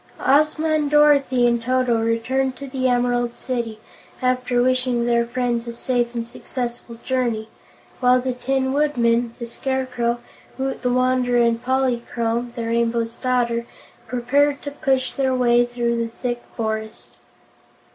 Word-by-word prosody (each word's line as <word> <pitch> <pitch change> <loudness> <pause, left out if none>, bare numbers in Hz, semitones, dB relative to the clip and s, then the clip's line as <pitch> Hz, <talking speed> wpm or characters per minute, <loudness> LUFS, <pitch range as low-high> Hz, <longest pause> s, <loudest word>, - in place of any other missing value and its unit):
Ozma 305 +3 +3
and 300 -2 +1
Dorothy 280 -4 +4
and 235 -1 +2
Toto 250 -1 +1
returned 255 +4 0
to 280 - -8
the 260 -1 -1
Emerald 245 -1 +1
City, 235 -4 -4 0.4
after 250 -1 +1
wishing 250 -1 +1
their 235 -1 +2
friends 240 -1 -1
a 235 - -4
safe 240 0 -1
and 230 -1 -2
successful 240 -1 -5
journey, 235 -4 -1 0.5
while 250 0 +4
the 255 0 -2
Tin 265 +1 -1
Woodman, 240 -5 +1
the 235 - -5
Scarecrow, 250 -1 -2 0.4
Woot 265 0 -3
the 250 - 0
Wanderer 250 -1 +2
and 235 0 +1
Polychrome, 240 -2 -1
the 235 - -3
Rainbow's 230 0 0
Daughter, 235 -2 0 0.4
prepared 280 +4 +1
to 285 - -4
push 270 -3 0
their 265 -1 0
way 240 -1 +4
through 240 -1 -1
the 230 0 -1
thick 240 +1 -4 0.2
forest. 220 -1 -4
245 Hz, 140 wpm, -22 LUFS, 235-260 Hz, 0.5 s, Dorothy